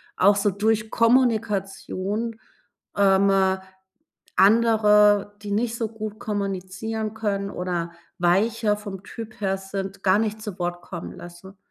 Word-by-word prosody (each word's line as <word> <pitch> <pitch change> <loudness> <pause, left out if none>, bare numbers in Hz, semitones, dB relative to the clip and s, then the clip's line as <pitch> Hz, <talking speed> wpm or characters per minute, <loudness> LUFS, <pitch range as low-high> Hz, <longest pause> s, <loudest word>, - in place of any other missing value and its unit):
auch 200 +2 +4
so 205 +1 +2
durch 215 +2 0
Kommunikation, 220 -2 0 0.6
ähm, 195 0 +4 1.1
andere, 210 -1 +5
die 205 - -5
nicht 225 +3 0
so 225 -2 -2
gut 215 -1 -6
kommunizieren 205 +1 -3
können 200 -3 -2
oder 175 -2 -3 0.3
weicher 210 +5 +2
vom 200 -2 -8
Typ 220 +1 -9
her 195 -1 0
sind, 195 0 -6
gar 185 +1 +4
nicht 215 -1 -2
zu 210 -4 -6
Wort 175 0 -3
kommen 85 - -7
lassen. 175 +3 -12
205 Hz, 125 wpm, -24 LUFS, 195-220 Hz, 1.1 s, andere